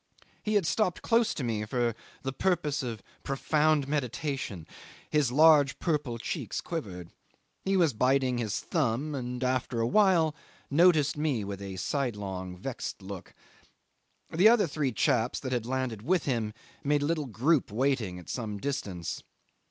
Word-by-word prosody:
He 215 0 -1
had 200 -4 +3
stopped 185 0 0
close 230 -1 +3
to 140 - -3
me 110 -3 -1
for 120 +2 0 0.3
the 135 -1 -2
purpose 155 -4 0
of 115 -5 -5 0.2
profound 150 +1 +1
meditation: 135 - -3 0.5
his 150 -5 +2
large 150 -1 +6
purple 150 -8 -1
cheeks 115 - -3
quivered. 95 - -5 0.5
He 195 0 +2
was 165 -7 +3
biting 130 +1 +2
his 110 -4 -1
thumb, 145 -1 -1
and 125 -2 -4
after 130 -1 0
a 115 - +2
while 170 - +4 0.4
noticed 155 -2 +4
me 145 -8 0
with 100 0 -6
a 95 -1 -6
sidelong 95 -7 -3
vexed 115 -1 -5
look. 95 -1 -8 1.0
The 185 +7 +6
other 230 -4 +5
three 150 -4 -1
chaps 125 0 +1
that 130 - -4
had 120 -2 -1
landed 130 -4 -2
with 175 +8 +1
him 115 -5 -1 0.3
made 145 0 +2
a - - +1
little 155 -2 -1
group 130 +3 +1
waiting 115 -6 0
at 90 - -11
some 110 -4 -4
distance. 100 -9 -4
130 Hz, 150 wpm, -29 LUFS, 110-155 Hz, 1.0 s, large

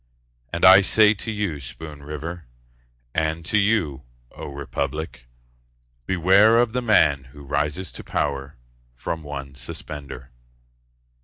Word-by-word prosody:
And 85 +2 +1
I 95 +2 +10
say 105 +2 +5
to 110 +2 -7
you, 100 -8 -2
Spoon 75 +3 -9
River, 75 +2 -7 0.7
And 80 +1 -1
to 105 +5 +2
you, 100 -10 +1 0.3
O - - -8
republic, 70 0 -5 0.8
Beware 95 +5 +5
of 120 -2 +2
the 125 - 0
man 75 - +3
who 70 +3 -14
rises 75 +5 -2
to - - -9
power 70 -2 -2 0.4
From 80 +6 -4
one 70 -2 -7
suspender. 65 0 -8
75 Hz, 125 wpm, -23 LUFS, 70-95 Hz, 0.8 s, I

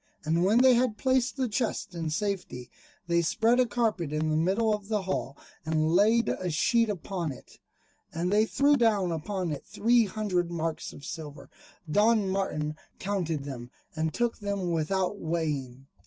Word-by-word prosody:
And 165 +3 +2
when 205 +5 +4
they 260 -1 +7
had 240 -3 +1
placed 260 0 +1
the 260 -1 0
chests 220 -3 -2
in 165 -2 -3
safety, 160 -8 -3 0.3
they 170 0 +2
spread 225 +8 +2
a 250 - +4
carpet 210 -9 -1
in 155 +1 0
the - - +1
middle 195 +7 +2
of 205 -1 -4
the 210 -2 -1
hall, 145 -7 -3 0.3
and 155 0 +1
laid 220 +6 +4
a 180 - -2
sheet 230 +8 +2
upon 180 -4 -3
it, 130 - -13 0.5
and 175 +4 -1
they 215 +1 +4
threw 285 +4 +3
down 210 -8 +2
upon 175 +2 -3
it 145 - -5
three 235 +1 +2
hundred 190 -4 -1
marks 165 -2 -3
of 140 - -12
silver. 150 0 -8 0.4
Don 210 +4 +3
Martin 155 -6 -2 0.2
counted 175 -7 -2
them, 125 -4 -7 0.3
and 160 0 -1
took 240 +4 -1
them 200 -4 -2
without 185 +5 0
weighing. 145 -6 -3
185 Hz, 170 wpm, -28 LUFS, 160-215 Hz, 0.5 s, they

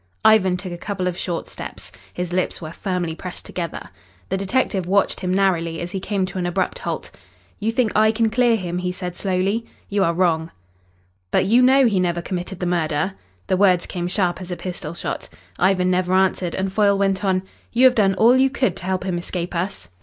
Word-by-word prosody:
Ivan 190 -4 +5
took 185 0 -6
a 175 - -7
couple 195 -1 -3
of 180 - -1
short 175 -1 -3
steps. - - -8 0.2
His 180 -1 -4
lips 185 0 0
were 155 -2 -7
firmly 180 -2 -2
pressed 180 +2 -8
together. 170 - -5 0.4
The 190 - 0
detective 195 -2 0
watched 200 +1 +2
him 180 -1 -2
narrowly 175 -4 +1
as 175 0 -5
he 190 - -3
came 195 0 -1
to 185 0 -5
an 175 - -1
abrupt 190 - -1
halt. - - -4 0.5
"You 220 +2 0
think 230 -1 +1
I 220 +1 +5
can 225 0 +1
clear 240 0 +4
him?" 180 -4 -3
he 180 0 -1
said 180 -1 -5
slowly. 195 +4 0 0.3
"You 200 -1 +2
are 170 -2 +1
wrong." 165 -3 +1 0.8
"But - - +2
you 235 +5 +5
know 265 +1 +6
he 205 -5 +2
never 175 -1 +1
committed 180 +1 -5
the 180 - -2
murder?" 170 0 0 0.3
The 185 - +1
words 185 -3 +4
came 175 -2 -3
sharp 180 -1 0
as 180 - -8
a 180 - -3
pistol 170 -3 -6
shot. - - -4 0.3
Ivan 185 0 +3
never 180 0 +1
answered, 185 -2 +2
and 190 0 -2
Foyle 200 -1 +3
went 195 0 +1
on: 190 -1 +1 0.3
"You 245 +2 +4
have 255 - +7
done 195 -5 +3
all 230 +6 +5
you 265 +1 +4
could 255 -9 0
to 180 - -8
help 185 -1 -1
him 180 -2 -1
escape 175 +1 -4
us. 170 - -3
185 Hz, 215 wpm, -22 LUFS, 175-200 Hz, 0.8 s, have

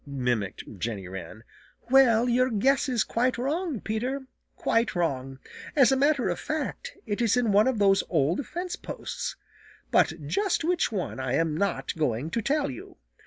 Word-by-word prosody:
mimicked 125 -7 -2 0.2
Jenny 100 -3 -3
Wren. 95 +4 -8 0.5
"Well, 250 -3 +6
your 250 +1 +3
guess 265 +6 +2
is 240 -4 +2
quite 250 +2 0
wrong, 295 - -1
Peter; 250 +5 -3 0.3
quite 230 -2 +1
wrong. 135 -6 -1 0.4
As 270 -3 +6
a - - +4
matter 280 -1 +2
of - - -2
fact, 310 -3 -4
it 205 +1 -2
is 235 0 +3
in 235 -4 +2
one 205 +4 +5
of 260 -3 +1
those 195 -1 +4
old 165 - +1
fence 355 +2 -4
posts. - - -5 0.6
But - - +2
just 400 -4 0
which 345 -3 +1
one 185 -9 -3
I 130 -1 -2
am 160 +1 +1
not 200 +3 -1
going 150 -1 -1
to 230 - 0
tell 285 - 0
you. 125 - -10
225 Hz, 165 wpm, -27 LUFS, -, 0.6 s, Well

